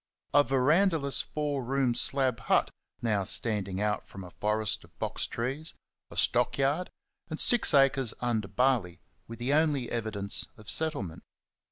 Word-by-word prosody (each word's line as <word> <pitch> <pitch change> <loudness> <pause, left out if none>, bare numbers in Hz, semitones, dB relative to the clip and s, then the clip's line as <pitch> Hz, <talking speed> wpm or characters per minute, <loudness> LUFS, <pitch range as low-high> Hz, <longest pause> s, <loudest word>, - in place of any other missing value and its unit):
A 145 +1 +6
verandahless 140 +3 +2
four 145 -3 -3
roomed 130 -1 0
slab 130 -3 +1
hut 115 - +1 0.3
now 105 -4 +1
standing 100 -2 0
out 105 0 -1
from 95 - -10
a 90 - -11
forest 105 +1 -1
of - - -21
box - - -3
trees, 135 +7 -4 0.3
a - - -11
stock - - +2
yard, 145 +6 0 0.4
and 155 - -5
six 240 -2 +3
acres 135 -4 +3
under 115 -4 -1
barley 110 -4 0 0.3
were 115 - -8
the 120 +4 -1
only 145 -5 +1
evidence 110 -4 +1
of 110 0 -3
settlement. 145 - 0
125 Hz, 150 wpm, -29 LUFS, 105-140 Hz, 0.4 s, A